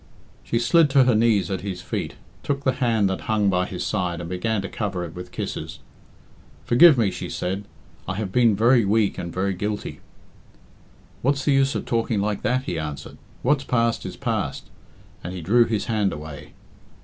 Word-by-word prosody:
She 115 - -1
slid 150 +6 +4
to 135 -1 +5
her 125 -1 +3
knees 110 -5 +2
at 95 - -2
his 95 -2 -5
feet, - - -4 0.3
took 140 0 -2
the 130 - +3
hand 115 -5 +3
that 95 0 -2
hung 105 -2 +2
by 90 0 +1
his - - -5
side 90 -2 -1
and 85 - -6
began 95 +4 -1
to - - -3
cover 100 -5 -3
it 80 - -9
with 90 0 -9
kisses. - - -5 0.9
"Forgive 135 - +7
me," 110 -5 +2
she - - -6
said; 95 +3 -3 0.4
"I 95 - -2
have 100 -2 -3
been 115 -1 +4
very 120 +3 +4
weak 105 +1 +1
and 85 -1 -5
very 95 +3 -1
guilty." 105 +3 -4 1.2
"What's 140 +2 0
the 145 - +3
use 135 0 +2
of - - -3
talking 115 -2 0
like 105 0 -1
that?" 130 +1 0
he 85 -10 -3
answered. 75 -2 -6 0.2
"What's 140 +2 +2
past 115 -3 0
is - - -8
past," - - -3 0.5
and 90 +1 -5
he 90 - -5
drew 115 +8 +4
his 110 -2 -1
hand 105 -4 +1
away. 75 -1 -9
105 Hz, 190 wpm, -23 LUFS, 90-120 Hz, 1.2 s, Forgive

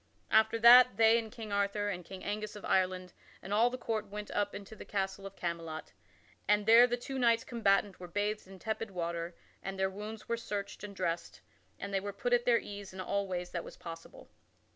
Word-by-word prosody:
After 220 +1 +4
that, 245 +2 +8
they 225 +1 +6
and 220 -2 -7
King 220 -2 -8
Arthur 200 +1 0
and 180 -3 -4
King 185 +2 -10
Angus 210 +1 -4
of 210 - -8
Ireland 185 -1 +1 0.3
and 195 - -6
all 225 +3 +5
the 255 - -5
court 220 -3 -2
went 210 +1 -7
up 205 0 -1
unto 205 +2 -9
the - - -9
castle 195 -1 -3
of 195 - -12
Camelot, 165 -3 -5 0.6
and 210 +1 +3
there 230 +3 +8
the 245 0 -1
two 265 +2 -5
knights 230 -2 +3
combatant 200 -4 +1
were 180 - -8
bathed 205 +2 -2
in 190 0 -12
tepid 220 +2 -3
water 170 -1 -4 0.3
and 195 0 -5
their 190 0 +1
wounds 210 +2 -8
were 235 - 0
searched 205 -3 -5
and 205 -1 -7
dressed 170 -2 -3 0.4
and 200 0 -6
they 195 - +2
were 200 +1 -5
put 245 +5 -1
at 240 0 +3
their 240 -1 +5
ease 200 -3 -7
in - - -8
all 200 +2 -1
ways 180 -1 -4
that 175 - -2
it - - -7
was - - -11
possible. 165 -1 -10
205 Hz, 220 wpm, -32 LUFS, 190-220 Hz, 0.6 s, that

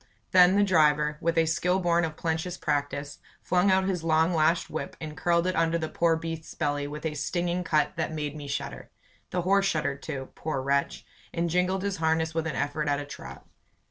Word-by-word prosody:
Then 185 0 +7
the 205 - +5
driver, 150 -5 +3
with 170 0 0
a 165 - +5
skill 180 +4 +1
born 175 -1 +2
of 155 -1 -6
plenteous 165 +2 -2
practice, 145 0 -2 0.2
flung 180 +2 +2
out 190 0 +4
his 180 -4 -1
long 160 +1 +3
lashed 165 +1 +2
whip - - -5
and 155 -1 -6
curled 170 +2 +1
it 185 - 0
under 165 0 +2
the 160 -1 -3
poor 170 -1 +2
beast's 165 -1 -6
belly 145 0 -1
with 150 +2 -7
a 155 - -1
stinging 175 +4 -1
cut 155 +1 +1
that 160 -1 -1
made 150 -2 -4
me 145 -2 -7
shudder. 140 - -5 0.4
The 180 -1 -1
horse 195 +2 +3
shuddered 145 -5 -1
too, 135 -1 -5
poor 155 -3 -3
wretch, 140 +1 -1 0.3
and 170 0 -1
jingled 180 +2 +1
his 200 -1 -2
harness 160 0 +1
with 165 0 -1
an 155 - -3
effort 150 +1 -1
at 145 0 +1
a 145 - -5
trot. 145 - -10
160 Hz, 205 wpm, -27 LUFS, 150-175 Hz, 0.4 s, Then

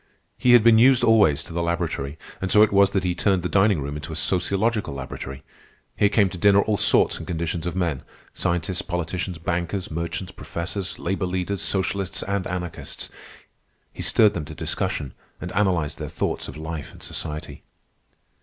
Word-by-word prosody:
He 125 -1 +4
had 120 -3 +7
been 115 -1 +7
used 130 +1 +6
always 100 -10 +4
to 85 - -10
the 85 - -1
laboratory, 85 -4 -2 0.2
and 95 - -1
so 105 - +7
it 110 - +2
was 100 0 +6
that 95 - -1
he 90 -1 0
turned 90 0 +1
the - - 0
dining 100 -1 +3
room 70 +1 -4
into 75 +2 -6
a - - -5
sociological 100 +2 0
laboratory. 70 0 -7 0.5
Here 100 - +3
came 105 -1 +3
to 90 - -8
dinner 100 +2 +5
all 105 0 0
sorts - - +3
and - - -8
conditions 85 0 -2
of 85 - -3
men,—scientists, 85 +1 -3
politicians, 90 0 -3
bankers, 85 +3 -2
merchants, 85 +3 -4
professors, 95 +3 -5
labor 95 +1 -2
leaders, 90 +2 -2
socialists, 95 -2 -1
and 100 -1 -2
anarchists. 90 -2 -6 0.8
He - - -7
stirred 105 -2 +4
them 80 -3 -4
to 75 0 -9
discussion, 70 -2 -2 0.3
and 90 - -6
analyzed 85 -7 0
their 75 -2 -5
thoughts 80 - -2
of - - -9
life 80 -1 -6
and - - -13
society. 75 -1 -6
90 Hz, 175 wpm, -24 LUFS, 80-100 Hz, 0.8 s, had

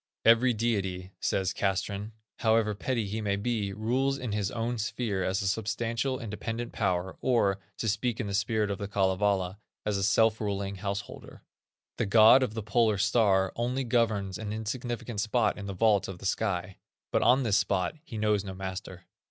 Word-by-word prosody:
"Every 115 +3 +6
deity", 100 -5 -1
says 95 -1 0
Castrén, 100 +2 -2 0.3
"however 110 -1 +3
petty 115 +2 -2
he 105 +3 -3
may 100 -2 0
be, 105 -1 -1
rules 125 +7 0
in 125 -4 -4
his 105 -1 -1
own 120 +1 -2
sphere 105 -3 -2
as 95 +3 0
a - - -1
substantial, 115 +5 -1
independent 115 +2 -5
power, 95 -3 -1
or, 105 -6 +2 0.2
to 115 - -2
speak 115 +2 0
in 120 - -1
the 100 - -4
spirit 105 +1 +1
of 100 - -4
The 100 - -3
Kalevala, 95 -1 +1 0.3
as 105 -1 0
a - - -1
self 110 +2 +3
ruling 100 -1 -2
householder. 100 +1 -6 0.5
The - - 0
god 110 +5 +7
of 115 -4 -1
the 110 - -3
Polar 110 0 +2
star 95 -3 +3
only 125 +3 -1
governs 110 -6 0
an 105 -2 -4
insignificant 115 0 -3
spot 110 +1 +1
in 100 - -6
the 100 - -5
vault 105 0 +3
of 95 - -7
the 95 - -11
sky, 90 -1 -1 0.3
but - - +2
on 130 +2 +4
this 110 -3 +3
spot 95 -3 0
he 115 - -8
knows 105 -2 +1
no 95 -2 -7
master." 95 -1 -6
105 Hz, 180 wpm, -29 LUFS, 100-115 Hz, 0.5 s, god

